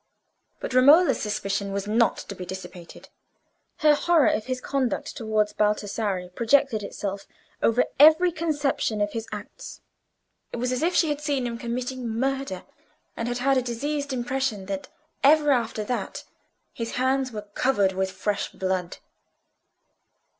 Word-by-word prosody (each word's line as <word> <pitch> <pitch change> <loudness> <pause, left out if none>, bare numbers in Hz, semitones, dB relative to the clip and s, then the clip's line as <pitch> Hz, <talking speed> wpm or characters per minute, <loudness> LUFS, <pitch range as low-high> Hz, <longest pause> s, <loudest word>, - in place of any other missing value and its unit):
But - - -5
Romola's 290 +8 +6
suspicion 200 -1 -2
was 200 0 -3
not 230 +3 +2
to - - -7
be 185 - -8
dissipated: 180 -1 -9 0.7
her 300 -1 +6
horror 330 0 +3
of 215 - -1
his 255 -1 -2
conduct 265 -2 -2
towards 215 -2 0
Baldassarre 210 -3 -1
projected 235 +3 +2
itself 200 0 -5 0.3
over 230 +2 +3
every 315 +4 +7
conception 290 -9 -1
of 205 0 0
his 225 0 -5
acts; 210 -1 -8 0.7
it - - -5
was 250 +1 -1
as 255 - -1
if 345 +3 +1
she 325 - +3
had 295 0 -2
seen 285 -4 -1
him 235 -1 -4
committing 250 +1 -4
a - - -3
murder, 265 -2 -2 0.5
and 230 - -3
had 245 0 -2
had 270 +2 +2
a - - +3
diseased 280 +4 -3
impression 245 -5 -2 0.6
ever 295 +1 +5
after 230 -4 0
that 245 +3 -4 0.5
his 230 -1 -5
hands 260 +1 +1
were 210 -2 -6
covered 205 -7 +2
with 190 0 -1
fresh 205 +2 -2
blood. 185 -2 -2
240 Hz, 145 wpm, -25 LUFS, 210-275 Hz, 0.7 s, every